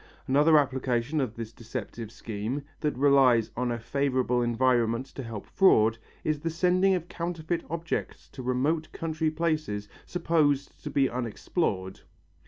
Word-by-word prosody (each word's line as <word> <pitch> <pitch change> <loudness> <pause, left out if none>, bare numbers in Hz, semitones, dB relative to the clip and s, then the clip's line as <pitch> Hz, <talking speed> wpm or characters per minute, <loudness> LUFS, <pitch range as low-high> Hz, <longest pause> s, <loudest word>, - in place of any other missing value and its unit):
Another 150 +4 +5
application 130 0 +1
of 120 -4 -3
this 115 -1 -6
deceptive 115 -1 -6
scheme, 115 +5 -4 0.2
that 150 -5 -1
relies 130 -5 +4
on 125 0 -1
a 120 - -1
favourable 130 0 0
environment 120 0 +2
to 135 - -9
help 115 -4 -6
fraud, 115 - +4 0.2
is 155 -1 0
the 165 - -2
sending 180 +3 +3
of 175 -1 -4
counterfeit 170 -1 -3
objects 165 +1 -4
to 130 - -9
remote 140 +6 0
country 160 -1 -1
places 155 -10 -1 0.2
supposed 155 -5 +1
to - - -4
be 135 -1 +3
unexplored. 115 - -2
135 Hz, 140 wpm, -28 LUFS, 115-155 Hz, 0.2 s, Another